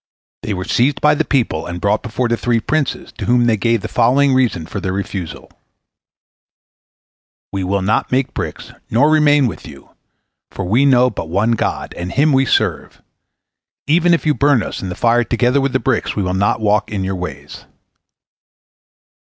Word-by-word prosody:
They 105 - -3
were 90 0 -5
seized 135 +7 +1
by 150 0 +4
the 150 - 0
people, 120 - -1
and 85 0 -5
brought 100 +3 0
before 120 +1 -2
the 115 - +1
three 115 0 0
princes, 145 +3 -2
to - - -3
whom 120 0 +3
they 115 -2 +3
gave 115 +1 0
the - - -5
following 135 +4 +2
reason 120 -11 +1
for 100 - -6
their 95 -1 -3
refusal: 95 -3 -6 2.0
"We 95 -1 -3
will 95 +1 -1
not 105 +4 0
make 130 +1 0
bricks, - - -6 0.2
nor 140 +7 +3
remain 145 -2 +4
with 105 -9 -5
you, 70 -3 -14 0.6
for 95 - -6
we 115 +10 +2
know 125 -1 +4
but 80 - -6
one 100 +7 +1
God, 115 - -2
and 90 +1 -5
Him 145 - +2
we 135 0 +2
serve; - - -1 0.9
even 170 +4 +3
if 165 - -5
you 150 - +3
burn 140 -5 +2
us - - -6
in 95 - -5
the 90 - -5
fire 120 +1 +2
together 125 +3 +1
with 135 0 0
the 130 - +1
bricks, 130 -4 -1
we 100 - -1
will 90 0 -2
not 100 +3 0
walk 105 -1 +1
in 100 -3 -2
your 95 +1 -2
ways." 90 0 -8
115 Hz, 185 wpm, -17 LUFS, 100-135 Hz, 2.0 s, by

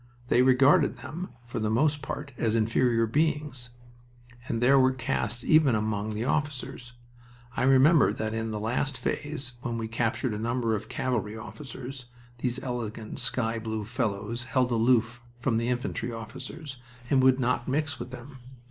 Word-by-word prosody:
They 125 - +5
regarded 130 +2 +5
them, 175 +4 -6 0.2
for 120 -1 -4
the 110 -1 0
most 145 +6 +2
part, 140 +1 -5
as 115 -2 0
inferior 115 +1 +2
beings. 145 -1 -1 0.8
And 115 - -1
there 135 +3 +5
were 130 0 +4
castes 120 -2 -2
even 155 -6 +5
among 105 0 -1
the 110 +3 -2
officers. 135 -3 -2 0.6
I - - -1
remember 135 +4 +6
that 110 0 -3
in 115 0 -2
the 105 -1 -3
last 125 +5 -1
phase, 145 -4 -2
when 120 -2 -3
we 115 -1 -3
captured 115 +1 -1
a 105 - -3
number 115 0 0
of 105 - -6
cavalry 110 -4 -2
officers, 125 +4 -8 0.3
these 125 0 -1
elegant 115 -3 -4
sky 115 -2 -1
blue 110 -1 -3
fellows 115 0 -2
held 125 0 +1
aloof 120 0 +2 0.2
from 120 -2 +1
the 115 +1 0
infantry 125 -1 -2
officers 130 +6 -7 0.3
and 135 -2 +5
would 130 0 +5
not 125 -1 0
mix 145 +1 -1
with 120 +1 -6
them. 130 +2 -10
120 Hz, 160 wpm, -28 LUFS, 115-130 Hz, 0.8 s, remember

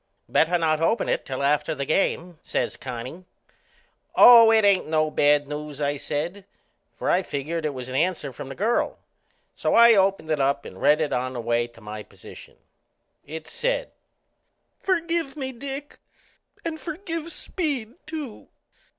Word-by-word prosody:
"Better 175 +3 +3
not 160 -2 +1
open 225 +8 +1
it - - -1
till 135 0 -3
after 145 +1 +1
the 140 - -3
game," 170 +1 0
says - - -2
Connie. 130 +7 -7 0.9
"Oh, 235 -2 +10
no; 225 - +5
it 220 -2 +4
ain't 200 -2 +3
no 155 -1 +1
bad 145 -1 +3
news," 150 0 -6
I 145 0 0
said, 175 +8 -4 0.5
for - - -5
I 180 - +3
figured 155 0 -3
it 145 - -4
was 125 -1 -6
an 130 - -7
answer 155 -2 0
from 135 - -8
the 135 - -7
girl. 225 +4 0 0.6
So - - 0
I 235 0 +8
opened 195 -5 +2
it 155 - +1
up 140 +1 +1
and - - -10
read 150 +2 +4
it 155 - -1
on 130 +1 -1
the 125 - -5
way 120 0 0
to 120 -1 -19
my 105 0 -7
position. - - -14 0.7
It 160 +2 -7
said: - - -2 0.9
"Forgive 335 -5 -1
me, 265 -2 -3
Dick 275 +3 -7 0.7
and 320 -1 -3
forgive 330 0 -5
Speed 280 - -3
too. 305 -8 -7
165 Hz, 165 wpm, -24 LUFS, -, 0.9 s, Oh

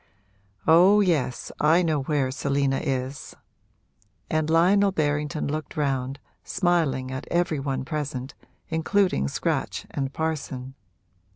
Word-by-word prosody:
'Oh 180 +6 +6
yes 160 -10 0
I 160 +4 +4
know 155 -4 +1
where 135 -2 0
Selina 140 0 0
is!' 135 -1 -3 1.0
And 155 0 +1
Lionel 190 +5 +4
Berrington 150 -3 -1
looked 155 +2 -4
round, 135 -2 -1 0.3
smiling 160 -9 0
at 130 0 -5
every 170 -3 +1
one 135 -1 -2
present, 140 -3 -4 0.4
including 165 - +1
Scratch - - -2
and 135 -1 -2
Parson. 140 -4 -4
150 Hz, 110 wpm, -25 LUFS, 135-165 Hz, 1.0 s, Oh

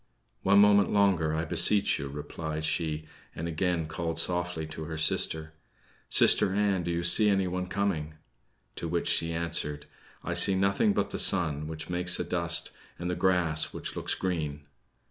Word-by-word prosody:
"One 100 +1 +3
moment 100 0 +4
longer, 95 -6 +1
I 80 +1 -2
beseech 100 +4 +3
you," 70 - -6
replied 75 +2 -6
she, 80 -1 -2 0.3
and 80 - -5
again 85 0 -2
called 80 +1 -5
softly 90 -2 -2
to 80 0 -8
her 80 0 -6
sister: 80 0 +1 0.6
"Sister 95 - +5
Ann, 100 -3 0
do 85 - -5
you 85 0 -2
see 105 +5 +5
anyone 90 -2 -1
coming?" 90 -6 -3 0.6
To 85 - -5
which 85 +1 -2
she 85 0 0
answered: 80 -3 -2 0.4
"I - - -4
see 95 - +6
nothing 100 - +1
but - - -2
the - - -4
sun, 75 -5 +2
which 80 0 -7
makes 90 0 0
a - - -1
dust, 85 0 0 0.3
and 90 +1 -4
the - - -2
grass, 85 -5 0
which - - -6
looks - - -3
green." 75 -6 -4
85 Hz, 165 wpm, -27 LUFS, 80-95 Hz, 0.6 s, see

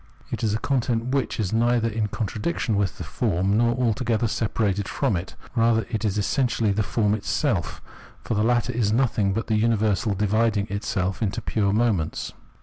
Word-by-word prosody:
It - - -3
is 105 -1 +1
a - - +2
con 130 +3 0
tent, 115 -1 -1
which 135 -5 -1
is 100 -3 -1
neither 120 0 +2
in 110 -1 -1
contradiction 110 - -2
with 100 -2 0
the - - -5
form 95 +4 0
nor 120 +1 +3
altogether 115 -1 +1
separated 105 -3 -1
from 105 - 0
it; 90 +1 -5 0.2
rather 115 -2 +2
it 110 -1 -2
is 105 -2 0
essentially 115 +1 +1
the 105 +2 0
form 105 0 +1
itself; 110 - -1 0.4
for - - -2
the 105 - +1
latter 120 +1 +1
is 110 -3 +1
nothing 110 -4 +2
but 110 +4 -2
the 110 - +1
universal 110 -2 +1
dividing 105 +1 +1
itself 100 -2 -2
into 110 +1 -1
its - - -6
pure 100 -3 +2
moments. 105 -7 0
110 Hz, 185 wpm, -24 LUFS, 100-115 Hz, 0.4 s, nor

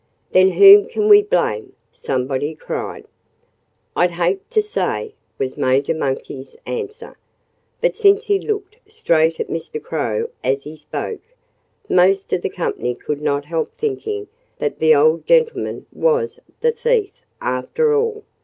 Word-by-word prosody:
"Then 185 +1 +5
whom 405 +1 +9
can 430 -3 -1
we 415 -1 +8
blame?" 415 -2 -1 0.2
somebody 135 +4 -2
cried. - - -6 0.9
"I'd 175 - +3
hate 175 +3 -2
to 460 - +2
say," 425 +1 -2 0.2
was 130 -1 -3
Major 130 +3 +1
Monkey's 135 -2 -4
answer. 460 0 -6 0.6
But - - +1
since 405 -1 +4
he 405 -2 +2
looked 420 0 -4
straight 165 - +1
at - - -2
Mr. 165 - -5
Crow 465 +1 -2
as 135 +1 0
he 150 +1 -9
spoke, 375 - -6 0.7
most 190 +2 +3
of 175 - +1
the - - -2
company 125 -9 -3
could 145 +3 -5
not 145 -1 -1
help 160 +1 -3
thinking 420 -1 -3 0.3
that 460 -3 -3
the 155 -1 +5
old 155 +3 +3
gentleman 480 -2 +1
was 475 0 0 0.2
the 475 - +3
thief, 470 -3 0 0.3
after 435 - 0
all. 445 -1 -1
395 Hz, 140 wpm, -19 LUFS, -, 0.9 s, whom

